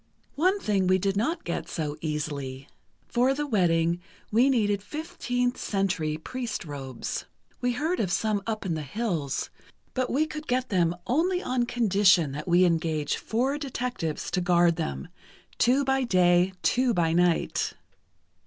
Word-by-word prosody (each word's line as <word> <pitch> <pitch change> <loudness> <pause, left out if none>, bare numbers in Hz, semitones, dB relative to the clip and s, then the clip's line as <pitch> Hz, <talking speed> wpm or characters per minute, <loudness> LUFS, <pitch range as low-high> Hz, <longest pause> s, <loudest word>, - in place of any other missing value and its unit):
"One 370 +7 +2
thing 200 - +1
we 185 0 +4
did 195 +1 0
not 280 - 0
get 170 - -4
so 150 -2 -3
easily: 145 -3 -4 0.4
For 255 +3 +2
the 295 +1 -2
wedding, 170 - +2 0.3
we 240 +5 +4
needed 205 -6 +2
15th 245 -2 -2
Century 180 -6 -1
priest 235 +4 -5
robes. 135 -4 -5 0.4
We 245 0 +1
heard 315 +8 -1
of 190 -4 0
some 215 +1 +1
up 215 -2 -3
in 175 - 0
the 155 - -2
hills, 155 - -2 0.4
but 255 -1 -1
we 300 +4 +2
could 310 0 -7
get 255 +1 0
them 175 -3 +2
only 355 +8 +1
on 250 -1 0
condition 195 - +3
that 150 +4 -6
we 175 +1 +5
engage 160 -3 0
four 260 +6 -1
detectives 245 - -3
to 180 - 0
guard 175 -1 +4
them, 70 - -4 0.5
two 260 +4 +3
by 265 0 +2
day, 180 -3 +3
two 250 -2 +2
by 165 -2 +2
night. 175 0 +1
195 Hz, 155 wpm, -27 LUFS, 165-250 Hz, 0.5 s, we